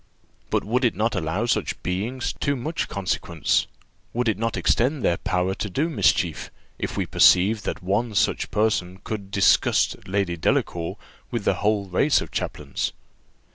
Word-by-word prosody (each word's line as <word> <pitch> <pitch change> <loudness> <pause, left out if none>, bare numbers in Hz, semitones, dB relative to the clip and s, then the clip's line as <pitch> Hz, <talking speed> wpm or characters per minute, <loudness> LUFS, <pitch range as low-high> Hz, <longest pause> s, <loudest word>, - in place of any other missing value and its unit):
But - - +1
would 125 +5 0
it 120 - +2
not 110 +2 0
allow 90 +4 -1
such 120 - -1
beings 110 +8 -2
too 140 - -1
much 155 +6 -3
consequence, 95 -3 0 0.5
would 125 +1 0
it 105 -3 +1
not 115 0 -1
extend 130 +3 +1
their 85 - +2
power 90 0 0
to 105 - -4
do 150 - -1
mischief, 85 - +1 0.3
if - - -3
we - - 0
perceived 100 +4 +4
that - - -4
one 105 +4 0
such - - +1
person 95 -4 0
could 100 -3 -5
disgust 100 0 +2
Lady 95 -2 0
Delacour 85 +1 0 0.3
with 120 -3 -3
the - - +4
whole 105 -1 +1
race 95 +11 +2
of - - -6
chaplains?" - - -3
105 Hz, 160 wpm, -24 LUFS, 95-120 Hz, 0.5 s, perceived